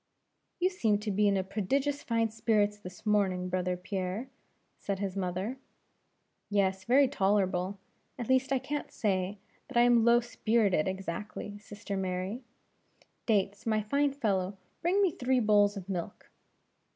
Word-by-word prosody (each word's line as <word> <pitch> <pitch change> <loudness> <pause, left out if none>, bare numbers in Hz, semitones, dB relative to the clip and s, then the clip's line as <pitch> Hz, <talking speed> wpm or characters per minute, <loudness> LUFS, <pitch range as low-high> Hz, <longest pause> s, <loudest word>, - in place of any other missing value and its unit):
"You 365 +1 +2
seem 220 - +2
to 210 +1 -3
be 205 +1 +3
in 195 -2 +2
prodigious 265 +9 -1
fine 230 -3 0
spirits 215 -2 +1
this 180 +1 -11
morning, 190 -4 +1
brother 180 0 -1
Pierre," 190 +6 -4 0.5
said 200 -1 -3
his 195 -1 -3
mother. 195 +6 -3 0.9
"Yes, 190 -2 +1
very 270 +3 +5
tolerable; 195 -5 +1 0.4
at 240 - -4
least 260 +1 +2
I 270 - +4
can't 285 +3 -4
say, 195 -2 -1 0.3
that - - -3
I - - +7
am 240 -1 +5
low 235 +1 +6
spirited 220 -7 +1
exactly, 195 +2 -5
sister 205 0 -7
Mary; 190 +4 -2 0.9
Dates, 200 -1 +1
my 215 -1 +1
fine 280 +6 +1
fellow, 195 -7 -1 0.2
bring 370 +5 +3
me 375 - +3
three 255 -2 +1
bowls 205 -2 +4
of 190 -2 -7
milk." 180 -4 -5
205 Hz, 145 wpm, -30 LUFS, 190-240 Hz, 0.9 s, I